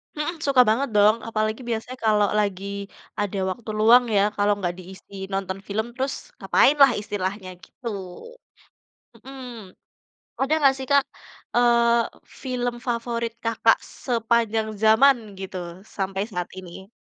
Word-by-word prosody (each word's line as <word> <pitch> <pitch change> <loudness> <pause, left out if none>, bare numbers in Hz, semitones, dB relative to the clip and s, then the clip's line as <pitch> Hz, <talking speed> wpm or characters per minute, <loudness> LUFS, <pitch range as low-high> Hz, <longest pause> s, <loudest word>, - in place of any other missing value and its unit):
Mhm, 310 +2 -3
suka 275 -4 +5
banget 250 +5 +1
dong, 210 +2 +5
apalagi 215 0 -1
biasanya 235 +3 -4
kalau 210 -1 +4
lagi 200 0 -3 0.3
ada 205 -1 -2
waktu 225 +3 -8
luang 235 +3 +7
ya, - - +5
kalau 205 0 +2
enggak 180 -3 -3
diisi 190 +1 -10
nonton 195 0 -3
film 220 +3 -2
terus 265 +2 -2 0.3
ngapainlah 275 +8 +5
istilahnya 195 -2 -4
gitu. 250 - -11 1.3
Mhm. 270 +1 -12 1.0
Ada 275 +3 +1
nggak 275 -3 +5
sih 265 - -6
Kak, 280 -1 +5 0.5
eee, 235 -1 +4 0.4
film 245 -2 -2
favorit 235 -1 -2
Kakak 230 0 +3 0.3
sepanjang 225 -2 +1 0.2
zaman 245 +5 +6 0.2
gitu 190 -1 -6 0.4
sampai 195 0 -2
saat 180 -2 -3
ini? 185 +1 -11
220 Hz, 125 wpm, -24 LUFS, 200-245 Hz, 1.3 s, luang